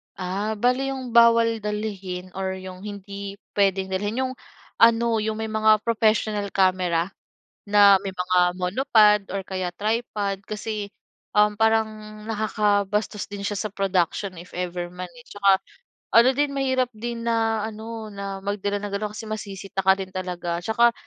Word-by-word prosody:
Ah, 195 +4 -2
bale 250 +5 +1
'yong 260 -3 -4
bawal 230 -1 +5
dalhin, 195 -4 -4
or 190 0 -3
'yong 185 -1 -9
hindi 200 -1 -7 0.2
puwedeng 195 -1 +1
dalhin 205 +5 -1
'yong 255 - -2 0.5
ano, 230 0 +5
'yong 215 0 -1
may 220 0 -4
mga 215 -1 +4
professional 215 -2 +1
camera 185 -2 +2 0.6
na 205 -1 +7
may 195 -1 -5
mga 180 0 0 0.2
monopod 210 +2 +4
or 195 - -1
kaya 185 -2 -3
tripod 210 -2 -1
kasi, 215 -1 -4 0.5
um, 210 0 +4
parang 215 -1 0
nakakabastos 210 -1 0
din 205 0 -7
siya 205 +1 -2
sa 215 +1 -3
production 190 0 0
if 175 - -13
ever 175 0 -3
man, 180 0 -7
eh, 245 0 -16
tsaka 200 -1 +3 0.6
ano 235 +2 +8
din 290 -1 +2
mahirap 260 -2 +1
din 235 +1 -5
na 225 -2 +1
ano 220 0 -7
na 200 -1 -5
magdala 205 0 -1
ng 205 - -5
ganon 210 +1 -2
kasi - - -6
masisita 195 -2 -4
ka 190 +1 +6
din 190 -1 -5
talaga. 175 -2 -3
Tsaka, 235 +3 +3
210 Hz, 150 wpm, -24 LUFS, 190-220 Hz, 0.6 s, ano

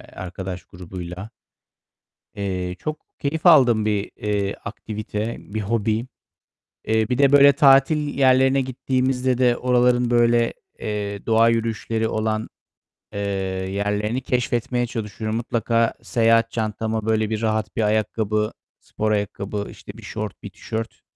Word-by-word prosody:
arkadaş 95 0 -6
grubuyla. 90 +2 -8 1.1
Eee, 90 -3 -3
çok 155 +6 -4 0.2
keyif 155 +4 -2
aldığım 120 -10 +6
bir, 105 -1 -1
eee, 100 -1 -1
aktivite, 110 0 -4
bir 110 +1 -6
hobi. 110 +2 0 0.8
Eee, 110 0 +1
bir 125 - 0
de 140 -1 +4
böyle 140 0 +8
tatil 140 +2 +5 0.2
yerlerine 130 0 +4
gittiğimizde 130 0 0
de 125 -2 +3
oraların 125 -1 +2
böyle, 120 0 +3 0.3
eee, 100 -1 -4
doğa 115 0 +5
yürüyüşleri 115 -1 -1
olan, 110 0 -1 0.7
eee, 100 - -4 0.5
yerlerini 105 +4 -1
keşfetmeye 120 -1 -1
çalışıyorum. 110 -1 -4
Mutlaka 115 -1 0
seyahat 115 0 +2
çantama 110 0 -2
böyle 110 -1 +1
bir 110 0 -2
rahat 110 -1 -1
bir - - 0
ayakkabı, 110 0 0 0.3
spor 110 0 -3
ayakkabı, 100 0 -2
işte, - - -10
bir - - -12
şort, 105 -2 -6
bir 105 - -6
tişört, 110 +3 -6
110 Hz, 125 wpm, -22 LUFS, 105-120 Hz, 1.1 s, böyle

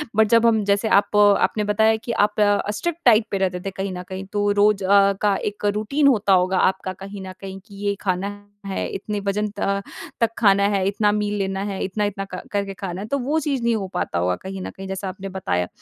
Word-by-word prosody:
But 220 0 +4
जब 230 +1 +5
हम 220 -2 +3
जैसे 200 +2 +1
आप 200 0 +3
आपने 205 +1 +4
बताया 220 +2 +3
कि 220 - -6
कि 235 - -2 0.2
आप - - -26 0.4
स्ट्रिक्ट 340 +10 -3
डाइट 225 -2 +6
पे 200 - 0
रहते 185 -2 -1
थे 195 - -2
कहीं 195 0 -4
न 180 - -6
कहीं 190 0 -6
तो 205 0 +1
रोज़ 205 -1 +3 0.4
का 205 -2 +3 0.2
एक 210 - -8
रूटीन 275 +8 +1
होता 210 -7 +3
होगा 185 0 +3
आपका 190 0 -7
कहीं 195 +1 -9
न 185 - -7
कहीं 195 -1 -7
कि 205 -2 -14
ये 200 0 +1
खाना 185 0 -1 0.4
है, 195 -1 -3
इतने 210 +1 -4
वज़न 205 +1 -1
त 200 0 0 0.4
तक 230 - +4
खाना 200 -3 +4
है, 195 -2 +1
इतना 205 +1 +2
मील 210 0 -1
लेना 195 0 -2
है, 195 - -4
इतना-इतना 195 0 -2
क 185 - -4
करके 200 -1 -2
खाना 190 -1 -6
है 210 - -6
तो 280 - 0
वो 285 +5 0
चीज़ 275 -5 -2
नहीं 235 -1 +2
हो 195 -3 -3
पाता 85 - -1
होगा 90 +1 +1
कहीं 190 0 -6
न - - -5
कहीं 195 0 -9
जैसा 190 0 -4
आपने 190 +1 -7
बताया। 90 - -2
200 Hz, 230 wpm, -22 LUFS, 190-210 Hz, 0.4 s, डाइट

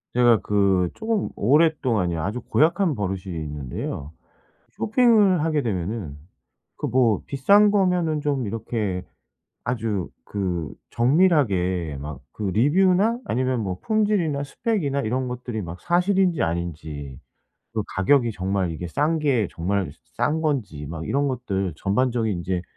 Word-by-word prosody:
제가 120 -2 +5
그 95 -3 +2
조금 220 -2 -1
오랫동안요. 120 - +2
아주 105 +9 -3
고약한 165 +1 +2
버릇이 95 -3 -2
있는데요. 75 -2 -5 0.6
쇼핑을 215 - +3
하게 155 -3 +1
되면은 95 - -3 0.6
그 - - -3
뭐 120 -5 +2
비싼 200 +10 +4
거면은 180 -6 +1
좀 140 -5 -1
이렇게 105 -3 -3 0.6
아주 110 -6 -2 0.2
그 90 -6 -3 0.2
정밀하게 110 - +2
막 75 0 -7
그 110 - -7
리뷰나 185 - +3
아니면 130 +1 0
뭐 95 -3 -3
품질이나 205 -10 +1
스펙이나 145 - -1
이런 125 +3 -1
것들이 125 -3 -4
막 85 -1 -8
사실인지 180 -1 +2
아닌지, 80 -5 -4 0.5
그 110 -2 -1
가격이 120 +5 +3
정말 95 -2 -1
이게 85 +2 -5
싼 150 - +1
게 130 -8 +2
정말 95 +1 -1 0.3
싼 155 +2 +1
건지 120 - -2
막 80 -1 -5
이런 140 +5 +1
것들 100 - -2
전반적인 110 0 0
인제 90 0 -2
115 Hz, 275 characters per minute, -24 LUFS, 90-155 Hz, 0.6 s, 제가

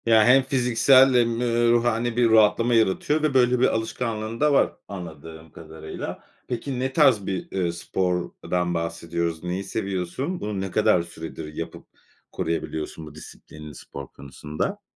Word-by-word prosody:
Ya, 110 -2 +5
hem 130 +2 +6
fiziksel 130 +1 +4
hem, 120 -1 +2
eee, 120 -1 +2
ruhani 120 0 +1
bir 120 -1 +4
rahatlama 110 +2 +4
yaratıyor 115 +8 +2
ve, 155 -3 +1
böyle, 125 -1 +3
bir 130 - +4
alışkanlığın 110 0 -3
da 150 -1 +3
var - - +3
anladığım 80 -3 -9
kadarıyla. 80 -1 -8 0.2
Peki, 125 +2 -4
ne 130 +1 -2
tarz 130 - +4
bir, 95 -1 -4
eee, 90 -3 -1
spordan 90 0 -2
bahsediyoruz? 85 0 -3
Neyi 90 +2 -3
seviyorsun? 100 - -3
Bunu 105 -2 -3
ne 95 -1 -4
kadar 105 -4 +3
süredir 80 -2 -8
yapıp 85 +1 -7 0.5
koruyabiliyorsun 80 -1 -4
bu 75 - -12
disiplinini 75 -2 -12
spor 70 +1 -9
konusunda? 75 - -5
105 Hz, 145 wpm, -24 LUFS, 85-120 Hz, 0.5 s, hem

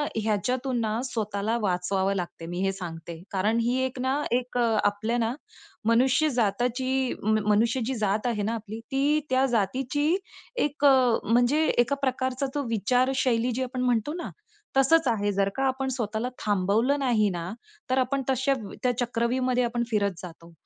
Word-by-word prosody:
ह्याच्यातून 240 +4 -1
ना, 220 0 -1
स्वतःला 215 -2 -2
वाचवावं 190 0 0
लागते 175 -2 -5
मी 175 +2 -5
हे 195 - +2
सांगते. 170 -3 -7
कारण 210 +4 +1
ही 240 +2 +1
एक 260 0 -5
ना 265 +3 0
एक 245 +1 -1
अ, 230 -2 +2
आपल्या 205 +3 0
ना 230 0 0 0.5
मनुष्य 255 +7 +3
जातीची, 250 +2 0
म 215 +1 +3
मनुष्य 230 +5 +2
जी 265 - -1
जात 215 +1 0
आहे 220 -4 -1
ना 220 +3 -1
आपली, 220 -1 -6
ती 285 +3 +2
त्या 260 +1 +3
जातीची 265 - 0 0.5
एक 290 0 -2
अ, 255 -4 +5
म्हणजे 245 +7 +3
एका 240 +4 +3
प्रकारचा 260 0 -1
तो 290 - 0
विचारशैली 245 +2 +1
जी 255 +2 -1
आपण 255 0 -4
म्हणतो 250 +2 +1
ना, - - -5 0.5
तसंच 320 +3 +4
आहे. 205 -3 +1
जर 195 0 +1
का 270 - -1
आपण 265 0 -1
स्वतःला 230 -1 -2
थांबवलं 210 +7 +1
नाही 235 -6 +2
ना, 175 -1 -4 0.4
तर 255 - +1
आपण 265 +1 +1
तशा 265 +1 +2 0.3
त्या 250 - +3
चक्रव्यूहमध्ये 250 +1 0
आपण 240 0 -1
फिरत 200 -2 +2
जातो. 170 -1 -11
240 Hz, 165 wpm, -26 LUFS, 210-260 Hz, 0.5 s, अ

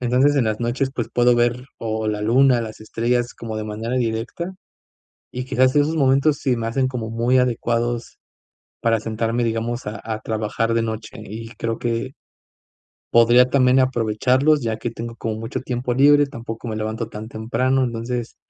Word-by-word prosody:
entonces, 125 +4 +3
en 130 - +3
las 110 -1 -1
noches 120 +3 -1
pues, 120 -2 -2
puedo 120 0 +4
ver 120 +2 +1
o 110 -1 -2
la 105 -1 -2
luna 125 +2 +4
las 110 -1 -7
estrellas 120 +2 -1
como 110 -1 -6
de 110 - -3
manera 110 +3 -4
directa, 120 +9 -2 0.8
y 125 - -4
quizás 130 0 +2
esos 150 +2 +3
momentos 140 0 +3
sí 130 -3 0
me 115 -1 -2
hacen 130 +3 +1
como 120 -4 -4
muy 120 +3 +2
adecuados 120 -1 0 0.6
para 115 -1 +2
sentarme 115 +2 -1
digamos 115 +1 -2
a 105 0 -5
a 110 -1 -3
trabajar 110 +1 -1
de 115 - +2
noche 110 0 -5
y 115 +2 -8
creo 115 0 -3
que 120 +2 -2 1.0
podría 120 +2 +6
también 130 -1 +4
aprovecharlos 130 +4 +2
ya 110 -1 -1
que 120 - -3
tengo 115 0 -7
como 110 -1 -3
mucho 115 +2 -4
tiempo 125 -1 -2
libre, 145 +2 +6
tampoco 115 -3 -7
me 110 - -3
levanto 110 +1 -3
tan 110 0 -8
temprano, 130 +4 0
entonces, 120 0 -4
120 Hz, 170 wpm, -21 LUFS, 115-130 Hz, 1.0 s, podría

